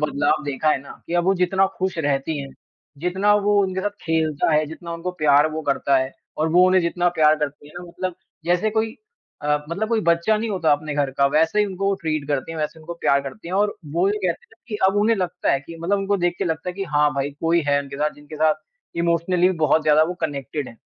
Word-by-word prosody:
बदलाव 150 +1 +1
देखा 145 +2 -1
है 135 - +1
ना - - -12
कि 170 - -4
अब 175 0 +2
वो 195 +1 +3
जितना 190 +1 +2
खुश 185 -2 -2
रहती 145 0 -1
हैं। 135 - -7 0.5
जितना 190 +5 +2
वो 205 0 +3
उनके 190 0 -2
साथ 205 +1 -1
खेलता 160 -2 0
है, 155 0 +3
जितना 170 +2 -8
उनको 175 +2 -4
प्यार 145 +1 +5
वो 155 +1 -4
करता 140 -1 +1
है 130 0 0 0.3
और 155 +1 +1
वो 180 +1 +6
उन्हें 185 0 +4
जितना 175 +1 +1
प्यार 155 0 +6
करती 145 -1 -4
हैं - - -17
ना, 180 - -9
मतलब 185 +1 -4 0.3
जैसे 180 +5 +1
कोई 220 +1 -1 0.5
अ, 150 0 +2
मतलब 215 +6 -2
कोई 230 -2 +1
बच्चा 170 +6 +3
नहीं 225 +1 -2
होता 175 -6 +1
आपने 150 0 -2
घर 140 -2 0
का, 140 +1 +2
वैसे 160 +7 +2
ही 210 - +4
उनको 195 +1 -1
ट्रीट 155 -3 -2
करती 145 +3 -2
हैं। 160 - -6
वैसे 155 +1 -3
उनको 170 +2 -7
प्यार 140 0 +3
करती 165 +6 -8
हैं 185 - -3
और 205 +1 +2 0.2
वो 175 +3 +2
ये 210 +1 0
कहते 170 - -3
हैं - - -37
कि 210 - -3
अब 195 - -1
उन्हें 220 +1 +3
लगता 180 -1 -1
है 135 - +1
कि 165 +4 -11
मतलब 200 +4 +1
उनको 200 +1 0
देख 175 0 +2
के - - -1
लगता 160 +1 -2
है - - -11
कि 195 0 -3
हाँ, 150 -2 +2
भाई 140 +1 -1
कोई 165 +1 +2
है 140 0 +4
उनके 140 0 -9
साथ, 150 +1 0
जिनके 145 +1 -11
साथ 155 0 +3 0.4
इमोशनली 170 +2 +2
भी 185 - -2
बहुत 155 0 +3
ज़्यादा 155 0 +5
वो 180 +2 -3
कनेक्टेड 145 -2 -3
हैं। 115 - -14
165 Hz, 250 wpm, -22 LUFS, 150-185 Hz, 0.5 s, वो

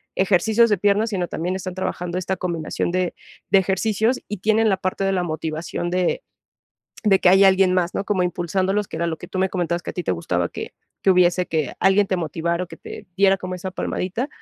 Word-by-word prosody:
ejercicios 210 +5 +3
de 210 - +2
piernas, 205 +4 +2
sino 185 -4 -2
también, 175 +3 -3
están 185 -1 -5
trabajando 180 -1 -3
esta 185 +1 -2
combinación 170 -2 -2
de 180 0 0 0.4
de - - +6
ejercicios 215 +5 +1
y 210 - -4
tienen 220 +3 +2
la 190 - +2
parte 185 +1 -2
de 195 - +1
la 180 -2 0
motivación 160 +1 -3
de 180 - 0 0.8
de 195 -2 +5
que 185 - +4
hay 190 +2 +6
alguien 190 -1 +5
más, 180 -1 0
¿no? - - -2
Como 200 -2 0
impulsándolos, 185 +3 0
que - - -8
era 170 +1 -1
lo 160 - -3
que - - -9
tú 185 - -5
me 190 - +2
comentabas 175 -2 -1
que - - -5
a - - -9
ti 180 - -4
te - - 0
gustaba, 85 0 -1
que - - -7 0.3
que 195 - +4
hubiese 180 0 +3
que 155 -5 -2
alguien 195 +1 +4
te 190 - 0
motivara 170 +1 -2
o - - -15
que - - -10
te - - -10
diera 195 0 +4
como 185 0 -5
esa 185 +1 -6
palmadita. 190 +8 -3
185 Hz, 225 wpm, -22 LUFS, 175-195 Hz, 0.8 s, de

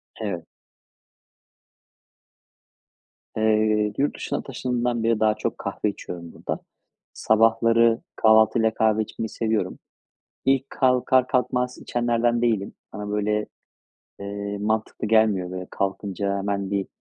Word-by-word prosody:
Evet. 95 -7 -4 2.9
Eee, 110 -1 +2
yurt 140 +2 +1
dışına - - -3
taşındığımdan 120 -2 -2
beri 115 -1 +2
daha 110 0 +4
çok - - -3
kahve 105 - -2
içiyorum 85 -4 -8
burada. - - -4 0.5
Sabahları 115 +1 +3
kahvaltıyla 110 0 +4
kahve 110 -1 +2
içmeyi 110 +1 -5
seviyorum. 110 -5 -1 0.7
İlk, 135 0 +2
kalkar 130 0 +3
kalkmaz 125 0 0
içenlerden 120 0 0
değilim. 110 -5 0 0.2
Bana, 105 0 -5
böyle, 105 0 0 0.7
eee, 100 0 -4
mantıklı 110 0 -1
gelmiyor. 105 -5 +3
Böyle, 90 0 -6
kalkınca 100 0 -2
hemen 100 0 -2
bir 100 -1 -1
110 Hz, 105 wpm, -24 LUFS, 100-115 Hz, 2.9 s, daha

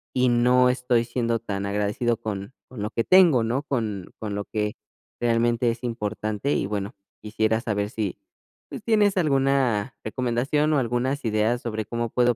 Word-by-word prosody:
y 130 0 +3
no 125 +1 +4
estoy 125 -2 +1
siendo 115 -1 -1
tan 100 -3 -4
agradecido 105 +3 0
con 110 +1 -5 0.2
con 120 -5 -8
lo 105 - -3
que 115 - 0
tengo, 175 -10 +6
¿no?, 125 +6 -1
con 110 -9 -3
con 105 -2 -4
lo 100 - -3
que 105 -1 -2 0.5
realmente 120 0 +2
es 120 +2 -8
importante. 110 +2 -2
Y - - 0
bueno, 100 -1 -3 0.3
quisiera 110 +1 0
saber 105 -2 -1
si, 105 -5 -3 0.5
pues, - - -8
tienes 210 -3 +3
alguna 135 - +1
recomendación 130 +6 0
o 150 - +3
algunas 130 +2 -1
ideas 110 +2 +1
sobre 110 -2 -3
cómo 120 -1 -3
puedo 120 0 +2
120 Hz, 165 wpm, -25 LUFS, 110-125 Hz, 0.5 s, tengo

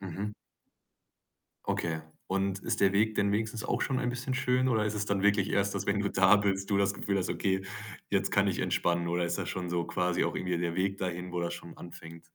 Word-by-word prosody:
Mhm. 100 +3 -4 1.3
Okay. 80 -2 -1 0.3
Und 95 0 0
ist 115 -1 -1
der 95 -1 +5
Weg 110 +2 +2
denn 100 - +2
wenigstens 110 +2 -1
auch - - 0
schon 130 -2 0
ein 125 - 0
bisschen 125 +2 -3
schön 130 0 +2
oder 110 -3 +2
ist 105 - -1
es 105 0 -1
dann 100 -1 0
wirklich 100 -1 +3
erst, 100 0 +1
dass - - -3
wenn 100 0 +2
du 100 - +1
da 100 +2 +6
bist, 100 -1 0
du 100 - +3
das 100 0 +2
Gefühl 100 0 -1
hast: 95 - -1
„Okay, 95 -1 0 0.5
jetzt - - +1
kann - - +4
ich - - -1
entspannen?” 85 0 +1
Oder 85 0 +1
ist 85 - -2
das - - -3
schon 90 -2 -3
so 85 -1 0
quasi 90 +1 0
auch - - -1
irgendwie 90 -1 -1
der 85 -1 -1
Weg 95 +1 0
dahin, 90 0 -3
wo 90 -1 -2
das 85 0 -2
schon 85 0 -10
anfängt? 85 -1 -11
95 Hz, 235 wpm, -30 LUFS, 90-105 Hz, 1.3 s, da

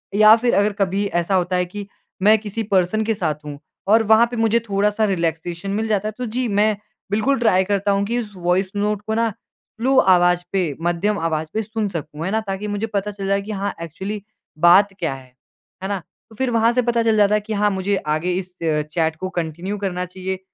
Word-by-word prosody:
या 215 +1 +8
फिर 240 +1 0
अगर 205 +1 +2
कभी 195 +1 +1 0.2
ऐसा 190 +3 0
होता 180 0 +1
है 180 0 +1
कि 200 +3 -8 0.4
मैं 215 +2 +6
किसी 215 +1 -4
पर्सन 190 +4 +2
के 225 +1 0
साथ 155 -6 -3
हूँ 145 -1 -7 0.3
और 225 +2 +5
वहाँ 225 +2 +7
पे - - -4
मुझे 225 +1 +3
थोड़ा-सा 210 0 0
रिलैक्सेशन 170 -1 -2
मिल 220 +2 -1
जाता 210 -1 0
है 215 - -2
तो 250 - -3
जी 250 -1 0
मैं 215 0 +3 0.4
बिल्कुल 245 +6 +1
ट्राई 205 -6 +3
करता 200 +1 0
हूँ 200 0 +1
कि 235 +4 -1
उस 215 -3 -6
वॉइस 180 +1 0
नोट 205 0 0
को 220 - 0
न 230 0 +2
स्लो 240 +5 -4 0.2
आवाज़ 175 0 +3
पे 195 -1 +1 0.2
मध्यम 175 +5 0
आवाज़ 160 -1 -1
पे 220 - 0
सुन 220 0 -3
सकूँ, 165 -3 -6
है 190 - -2
ना? 220 - +1
ताकि 195 +2 -3
मुझे 205 +2 -2
पता 210 -1 -2
चल 195 -1 -6
जाए 200 0 +1
कि 210 +2 -7
हाँ 200 -1 -2
एक्चुअली 190 +6 -5 0.4
बात 190 +4 +6
क्या 165 -5 -1
है? 135 -1 -11 0.6
है 190 - -2
ना? 200 -2 -1 0.3
तो 220 - -16
फिर 260 +3 -1
वहाँ 230 0 +3
से 250 - +2
पता 235 -1 +1
चल 225 -1 +2
जाता 205 0 +4
है 210 - +1
कि 215 +1 -5
हाँ, 210 0 +2
मुझे 195 +1 0 0.2
आगे 170 +4 -1
इस 185 0 -3
अ, 155 -2 +1
चैट 160 +1 -1
को 185 +3 -5
कंटिन्यू 175 +3 -4
करना 185 -2 -2
चाहिए। 185 +1 -5
200 Hz, 230 wpm, -21 LUFS, 180-215 Hz, 0.6 s, या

